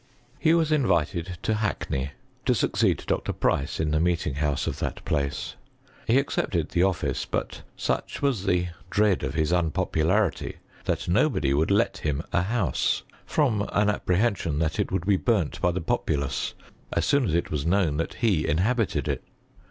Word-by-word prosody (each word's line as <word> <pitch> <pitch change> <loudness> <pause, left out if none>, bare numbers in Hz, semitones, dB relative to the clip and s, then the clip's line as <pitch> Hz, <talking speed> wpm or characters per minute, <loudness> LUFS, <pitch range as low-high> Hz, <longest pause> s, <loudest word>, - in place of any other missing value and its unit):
«■ - - -35 0.4
He 160 0 +4
was 160 -2 +2
invited 90 - +1
to 110 - +1
Hackney, 100 -10 -1 0.4
to - - +4
succeed - - +1
Dr. - - -1
^B^ice 70 - 0
in 80 -1 0
the 75 - +2
meeting 85 -3 +1
house 70 -1 0
of - - -3
that - - -4
place. 70 -1 -2 0.5
He 115 - +4
^Mecepted 105 - 0
the 85 - +1
office, 95 -2 0
but - - -3 0.2
such - - -2
was 130 -9 0
the 90 -1 +2 0.2
dread 105 -2 +2
of 70 +1 -3
his 80 0 +1
^Snpopularity, 85 +2 +1 0.3
that - - -1
nobody 70 - +2
would 80 +5 +2
let 100 +4 +2
him 75 0 -1
a 90 - +3
house, 95 - 0 0.3
hoia 115 -9 +1
an 105 0 +3
apprehension 95 -5 0
that 80 0 0
it - - 0
would 95 -2 -1
be 100 -1 +4
burnt 100 -7 0
by 90 - +3
the 90 0 -2
populace 70 -3 -1 0.4
as - - +1
soon 140 -3 +3
as 85 - 0
it 85 - 0
was 75 0 -1
known 85 -5 +2
that 80 - -2
he 100 -10 +1
inhabited 105 +8 +1
it. - - -2
90 Hz, 175 wpm, -26 LUFS, 75-105 Hz, 0.5 s, He